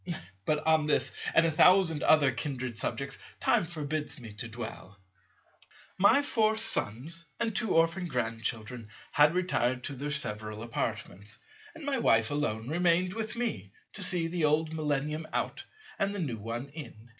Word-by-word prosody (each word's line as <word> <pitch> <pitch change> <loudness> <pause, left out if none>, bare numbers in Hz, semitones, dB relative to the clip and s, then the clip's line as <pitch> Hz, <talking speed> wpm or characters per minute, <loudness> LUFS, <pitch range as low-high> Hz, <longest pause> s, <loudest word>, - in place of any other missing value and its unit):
But 150 0 0
on 160 -1 +3
this, 150 - +2 0.2
and 165 - +6
a 165 - +2
thousand 170 -1 +5
other 145 -4 +5
kindred 130 -1 -4
subjects, 135 +4 -2 0.2
time - - +2
forbids 155 -2 -4
me 115 -4 -10
to 115 +3 -4
dwell. 110 -4 -8 1.0
My 240 +9 +6
four 220 -5 +2
Sons 170 - 0
and 230 -3 -1
two 220 -6 +1
orphan 165 +3 +2
Grandchildren 115 -3 -3 0.2
had 150 +3 +5
retired 130 -9 0
to 145 - -4
their 145 +3 -4
several 110 -6 -3
apartments; 105 -1 -4 0.4
and 320 -3 -9
my 275 -3 0
wife 115 - +3
alone 120 -6 -2
remained 175 +3 +2
with 220 0 -3
me 105 - -3 0.2
to 205 - -5
see 180 -3 +5
the 165 0 -2
old 155 +1 +1
Millennium 150 0 -2
out - - -2 0.3
and 200 0 0
the - - -2
new 130 -10 -3
one 115 +5 -5
in. 120 -6 -11
150 Hz, 155 wpm, -30 LUFS, 120-175 Hz, 1.0 s, and